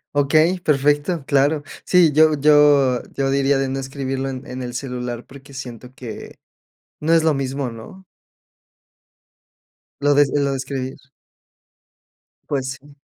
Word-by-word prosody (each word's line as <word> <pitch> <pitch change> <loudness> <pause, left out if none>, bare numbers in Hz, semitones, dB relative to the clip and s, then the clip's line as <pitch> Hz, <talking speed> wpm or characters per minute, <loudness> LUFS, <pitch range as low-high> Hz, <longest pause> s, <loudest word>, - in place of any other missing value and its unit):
Okey, 155 +5 +2
perfecto, 145 +1 +1
claro. 145 +2 +2 0.2
Sí, 175 -4 +4
yo 155 +1 +5
yo 145 -3 +4
yo 135 -1 0
diría, 140 0 +2
de 135 0 -1
no 135 +1 -3
escribirlo 135 0 -4
en 130 -1 -7
en 125 +1 -6
el 120 -1 -6
celular. 125 -2 -5
Porque 140 +1 -14
siento 125 -1 -9
que 120 -5 -9 0.6
no 160 +2 +1
es 165 -1 +4
lo 160 - +3
mismo, 135 -1 -3
¿no? 115 +12 -12 2.0
Lo 145 0 +3
des 145 -1 +4
lo 140 -1 +1
de 135 - -2
escribir. 135 -1 -5 1.5
Pues 135 -2 -2
sí. 145 +1 -19
140 Hz, 135 wpm, -20 LUFS, 130-145 Hz, 2.0 s, yo